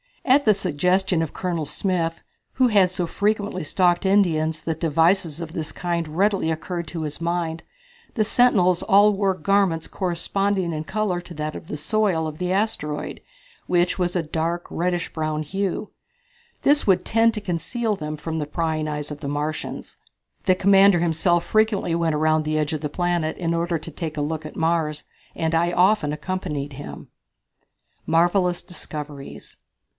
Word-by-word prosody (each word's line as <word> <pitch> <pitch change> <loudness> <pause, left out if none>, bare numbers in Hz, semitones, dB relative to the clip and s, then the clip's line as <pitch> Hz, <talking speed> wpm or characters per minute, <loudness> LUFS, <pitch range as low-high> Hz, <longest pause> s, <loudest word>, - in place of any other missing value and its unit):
At 280 +2 +4
the 215 - +6
suggestion 180 0 +1
of 160 - -3
Colonel 170 -4 -2
Smith, 165 0 -1 0.3
who 255 -1 +3
had 200 -4 +4
so 180 -1 -2
frequently 205 0 -1
stalked 175 +3 +2
Indians 160 -5 +2
that 160 -1 -3
devices 165 +1 +2
of 165 -1 -6
this 160 -2 -4
kind 170 -2 -2
readily 190 +2 +1
occurred 170 +1 -3
to 160 +1 -5
his 150 +1 -5
mind, 170 -1 -2 0.5
the 220 - +3
sentinels 205 -6 +3
all 205 +1 +5
wore 195 -1 +1
garments 185 -2 +1
corresponding 190 0 -1
in 155 0 -4
color 200 -3 -1
to 175 0 -11
that 150 0 -4
of - - -9
the 150 - -5
soil 175 +1 +1
of 155 -1 -6
the 180 0 -1
asteroid, 150 -7 -2 0.5
which 175 +1 +1
was 180 0 0
of 170 -3 0
a - - -15
dark, 165 +2 -2
reddish 175 0 -1
brown 155 -1 -2
hue. 195 +5 -3 0.7
This 290 -3 +3
would 185 -2 +4
tend 225 0 +3
to 210 - -3
conceal 210 +5 -2
them 155 -4 -5
from 160 +1 -4
the 150 - -3
prying 155 0 -1
eyes 150 -1 -4
of 145 - -6
the 140 - -5
Martians. 150 +2 -4 0.5
The 185 - +4
commander 195 -1 +5
himself 170 +1 +2
frequently 215 -5 +1
went 165 -2 +1
around 155 +1 +2
the 155 0 -1
edge 150 0 0
of 155 - -3
the 150 - -2
planet 175 0 -1
in 170 -2 -1
order 170 0 0
to 160 +1 -8
take 160 -3 -5
a - - 0
look 155 +1 -3
at - - -12
Mars, 160 -2 0 0.3
and 160 0 -1
I 170 +1 +2
often 180 -4 +3
accompanied 150 -3 -4
him. 145 +2 -9 1.0
Marvellous 175 +2 +2
Discoveries. 150 -5 -7
170 Hz, 170 wpm, -23 LUFS, 155-190 Hz, 1.0 s, the